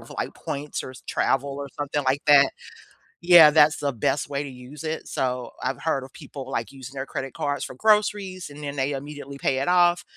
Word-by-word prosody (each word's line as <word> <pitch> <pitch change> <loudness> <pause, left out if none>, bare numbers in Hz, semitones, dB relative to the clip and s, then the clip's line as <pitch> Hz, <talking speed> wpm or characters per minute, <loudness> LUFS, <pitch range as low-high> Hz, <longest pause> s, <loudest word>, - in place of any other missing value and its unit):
with, - - -15
like, - - -4
points 145 +1 -5
or 130 - -8 0.2
travel 135 +1 +1
or 140 0 -5
something 145 0 -1
like 130 +2 +1
that. 140 -2 +7 0.7
Yeah, 170 -3 +8
that's 155 +2 +5
the 140 -1 -1
best 125 +5 -1
way 140 0 -1
to - - -6
use 130 +4 -11
it, 160 0 -4
so 125 -1 -2
I've 130 +2 -2
heard 140 -5 0
of 130 - -13
people, 135 -2 -9
like, 135 - -3
using 135 -1 -10
their 135 0 -4
credit 135 -1 -5
cards 145 0 -2
for - - -8
groceries 205 0 +1
and 145 +1 -11
then 140 0 -5
they 135 +1 0
immediately 140 0 -7
pay 135 -1 0
it 135 - -1
off 175 -1 +4
140 Hz, 215 wpm, -24 LUFS, 135-155 Hz, 0.7 s, Yeah